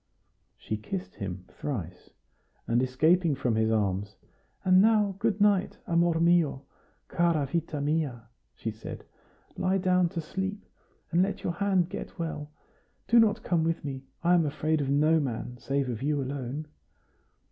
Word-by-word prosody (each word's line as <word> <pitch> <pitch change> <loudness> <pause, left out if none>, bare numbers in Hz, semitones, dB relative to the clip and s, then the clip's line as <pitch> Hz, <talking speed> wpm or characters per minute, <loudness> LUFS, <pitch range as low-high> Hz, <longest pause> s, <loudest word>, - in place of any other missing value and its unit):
She 110 - -4
kissed 180 - -5
him 95 -2 -5
thrice, 90 - -6 0.6
and, 120 +1 +2
escaping 155 +5 +3
from 125 -4 0
his 110 0 +2
arms: 100 -2 0 0.5
"And 185 0 +6
now 210 -2 +3
good 215 -1 0
night, 205 -2 +3
amor 170 -2 +2
mio, 170 -5 +3 0.4
cara 170 -4 +1
vita 160 +1 -2
mia!" 145 -5 -1 0.3
she 110 - -4
said. 110 +1 -8 0.5
"Lie 185 +1 +1
down 180 -1 +2
to 165 - -4
sleep, 190 +5 -4 0.5
and 170 +1 +3
let 195 +2 -1
your 170 - -1
hand 185 -1 +1
get - - -7
well. 155 -3 -4 0.6
Do 235 - +6
not 220 -2 +3
come 170 -2 +1
with 165 -2 -1
me; 135 -2 -5 0.2
I 175 +1 +4
am 170 -3 +4
afraid 155 +1 0
of 135 - -2
no 155 +3 +4
man, 125 -3 -4
save 135 +2 -1
of 120 -2 -4
you 145 +1 0
alone." 135 +2 -4
155 Hz, 155 wpm, -28 LUFS, 130-180 Hz, 0.6 s, And